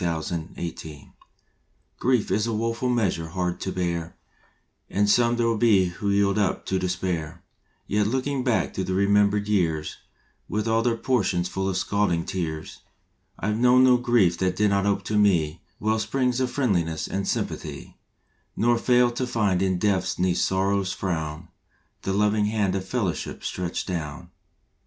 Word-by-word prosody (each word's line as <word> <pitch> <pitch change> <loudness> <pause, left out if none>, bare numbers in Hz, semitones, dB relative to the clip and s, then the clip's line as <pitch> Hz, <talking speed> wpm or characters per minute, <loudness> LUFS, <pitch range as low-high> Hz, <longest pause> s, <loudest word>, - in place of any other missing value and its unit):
March 80 -2 -2
Nineteenth 80 -3 -6 0.9
COMFORT 125 -3 +1
is 105 +2 +1
a 115 - -1
woeful 115 +3 -1
measure 100 -9 0
hard 90 +1 -2
to 95 - -3
bear, 85 -3 -3 0.7
And 105 +1 +1
some 120 +3 +3
there 115 -1 +1
be 105 -5 +4
who 100 +3 -4
yield 100 +1 +2
up 100 - 0
to 95 - 0
despair, 90 -3 -3 0.4
Yet, 105 0 +1
looking 130 +3 -1
back 125 -4 0
through 95 - -2
the 95 - -2
remembered 100 +1 +3
years 80 -7 0 0.5
With 110 +1 -1
all 115 0 +2
their 115 -1 +1
portions 95 -9 0
full 95 +1 -2
of 95 - -1
scalding 95 -4 0
tears, 80 -4 -4 0.6
I 105 - -1
ve 105 - -1
known 125 +1 +5
no 125 -1 +6
grief 120 -8 +2
that 95 -1 0
did 105 +1 +2
not 100 0 +1
ope 100 - 0
to 105 -1 0
me 85 -7 +2 0.2
Well 110 +1 +1
springs 125 +3 0
of 130 -1 0
Friendliness 90 - 0
and 100 0 -3
Sympathy; - - -4 0.6
Nor 120 +1 +2
failed 120 0 +3
to 130 - -1
find 105 -6 +1
in 95 -1 +1
depths 95 -1 0
neath 90 -1 +1
sorrow 95 +1 +1
s 95 -1 -3
frown 80 -2 -3 0.5
The 95 - -2
loving 105 +1 +2
hand 105 -3 0
of 95 -1 -3
Fellowship 100 -9 -3
stretched 90 -2 -3
down. 80 -6 -5
100 Hz, 165 wpm, -25 LUFS, 90-115 Hz, 0.9 s, no